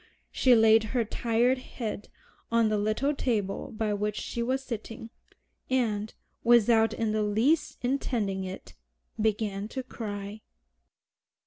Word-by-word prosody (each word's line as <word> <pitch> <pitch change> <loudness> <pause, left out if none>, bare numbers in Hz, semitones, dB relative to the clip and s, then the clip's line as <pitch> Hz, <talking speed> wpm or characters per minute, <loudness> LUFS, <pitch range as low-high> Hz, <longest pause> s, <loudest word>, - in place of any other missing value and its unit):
She 255 -2 +4
laid 220 0 +5
her 235 -2 +2
tired 240 +4 +1
head 225 -5 -6 0.4
on 230 -1 +3
the 215 - +1
little 215 +8 0
table 220 -5 -2
by 215 -2 -1
which 210 0 -1
she 235 - -4
was 260 +3 -1
sitting, 225 -1 -7 0.6
and, 220 -5 0 0.3
without 230 -1 +5
in 225 -2 -1
the 215 0 0
least 230 +10 +1
intending 230 -7 -1
it, 190 +1 -8 0.5
began 210 -2 -1
to 260 +3 -5
cry. 205 -3 -6
225 Hz, 125 wpm, -28 LUFS, 210-240 Hz, 0.6 s, laid